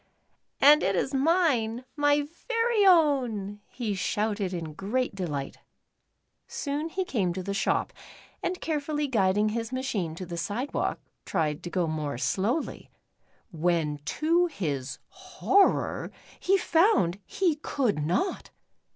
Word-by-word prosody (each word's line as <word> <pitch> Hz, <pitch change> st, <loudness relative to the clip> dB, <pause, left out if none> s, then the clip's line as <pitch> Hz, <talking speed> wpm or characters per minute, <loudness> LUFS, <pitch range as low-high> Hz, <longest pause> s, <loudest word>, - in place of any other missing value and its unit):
"And 295 Hz, +2 st, +7 dB
it 195 Hz, +1 st, +1 dB
is 265 Hz, +10 st, -1 dB
mine, 265 Hz, -6 st, +2 dB
my 290 Hz, -1 st, +2 dB, 0.2 s
very 460 Hz, -3 st, +3 dB
own," 250 Hz, -, +3 dB
he 230 Hz, -5 st, -3 dB
shouted 205 Hz, 0 st, -1 dB
in 165 Hz, -4 st, -5 dB
great 225 Hz, +10 st, -2 dB
delight. 150 Hz, -8 st, -4 dB, 0.9 s
Soon 290 Hz, +2 st, -3 dB
he 375 Hz, +2 st, -2 dB
came 195 Hz, -, 0 dB
to 185 Hz, +1 st, -5 dB
the 200 Hz, -, -3 dB
shop, 200 Hz, -, 0 dB, 0.5 s
and 360 Hz, +1 st, -2 dB
carefully 300 Hz, -1 st, -2 dB
guiding 210 Hz, -3 st, +2 dB
his 230 Hz, +1 st, -3 dB
machine 225 Hz, -11 st, -2 dB
to 185 Hz, -, -6 dB
the 170 Hz, -1 st, -6 dB
sidewalk, 210 Hz, -, -2 dB, 0.2 s
tried 155 Hz, -5 st, -1 dB
to 175 Hz, -, -6 dB
go 180 Hz, 0 st, 0 dB
more 155 Hz, -4 st, -3 dB
slowly, 215 Hz, -, -1 dB, 0.6 s
when 160 Hz, -3 st, 0 dB
to 335 Hz, +3 st, +2 dB
his 145 Hz, -, -4 dB, 0.2 s
Jiorvor 395 Hz, 0 st, +1 dB, 0.3 s
he 390 Hz, +2 st, +3 dB
found 330 Hz, -, +3 dB
he 340 Hz, -, 0 dB
could 245 Hz, -, -1 dB
not 185 Hz, -, -1 dB
220 Hz, 125 wpm, -27 LUFS, 180-300 Hz, 0.9 s, And